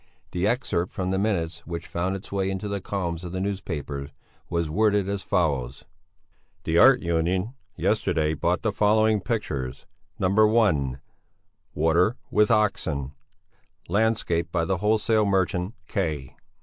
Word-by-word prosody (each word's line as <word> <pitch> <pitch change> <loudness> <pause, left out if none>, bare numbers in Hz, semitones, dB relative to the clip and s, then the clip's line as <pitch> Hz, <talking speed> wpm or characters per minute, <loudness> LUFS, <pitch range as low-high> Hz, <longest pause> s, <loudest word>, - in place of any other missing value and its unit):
The 90 +2 0
excerpt 95 -7 0
from 95 0 -2
the 95 - 0
minutes 85 -6 -1
which 85 -1 -5
found 90 +3 -2
its 95 - -9
way 95 -1 0
into 95 +2 -3
the 100 -1 -3
columns 90 -4 -3
of 90 0 -6
the 95 - -2
newspapers, 75 -8 -4 0.4
was 85 -1 0
worded 105 +3 +2
as 100 -1 -2
follows: 70 -11 -1 0.8
"The 80 +1 +2
Art 130 -2 +7
Union 90 +6 0 0.2
yesterday 80 0 +1
bought 70 - 0
the - - +1
following 110 0 +3
pictures: 70 - -3 0.3
(1) 95 - +3 0.8
'Water 85 +8 +2
with 105 0 +4
Oxen,' 80 -10 +1 0.8
landscape 100 -4 +1
by 85 -2 0
the 95 +2 0
wholesale 110 +2 +2
merchant 95 0 0
K. 75 -9 -3
95 Hz, 135 wpm, -25 LUFS, 80-105 Hz, 0.8 s, Art